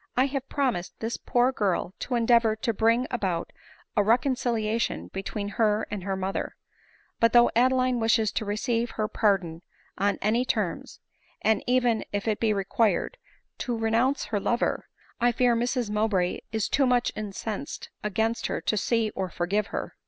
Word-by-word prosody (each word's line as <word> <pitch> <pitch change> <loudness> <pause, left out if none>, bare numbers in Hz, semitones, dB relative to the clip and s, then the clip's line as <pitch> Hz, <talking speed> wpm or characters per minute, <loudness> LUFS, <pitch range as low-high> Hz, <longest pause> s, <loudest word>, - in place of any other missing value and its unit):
" - - -32
I 255 - +5
have 275 -1 -4
promised 250 -11 -1
this 225 +1 -2
poor 245 +1 +1
girl 195 -6 -1
to 250 - -2
endeavor 230 -1 +4
to 230 +1 -1
bring 230 +4 +2
about 190 -8 -2 0.4
a - - +4
reconciliation 230 -1 0
between 200 +1 -4
her 215 -1 +3
and 205 -3 -4
her 195 0 -2
mother; 190 +1 -3 0.6
but 230 0 +4
though 240 0 +6
Adeline 255 0 +3
wishes 225 -1 +2
to - - -2
receive 230 +3 -1
her 215 -1 0
pardon 190 -7 0 0.4
on 200 +1 +1
any 225 +4 +2
terms, - - -3 0.4
and 220 0 +2
even, 245 -2 +2
if 205 +2 -3
it 215 -2 0
be 225 -2 +2
required, 210 - 0 0.4
to 240 -2 -2
renounce 230 +5 +1
her 210 -1 -1
lover, 240 +4 0 0.3
I 240 0 +4
fear 240 0 +3
Mrs 240 -1 -1
Mowbray 210 -4 +1
is 220 -2 0
too 275 -1 +2
much 245 -1 +2
incensed 210 0 -5
against 220 +3 0
her, - - -2
to - - -1
see 225 +1 +1
or 190 -2 -3
forgive 195 +5 -1
her." - - -5
225 Hz, 165 wpm, -26 LUFS, 205-240 Hz, 0.6 s, though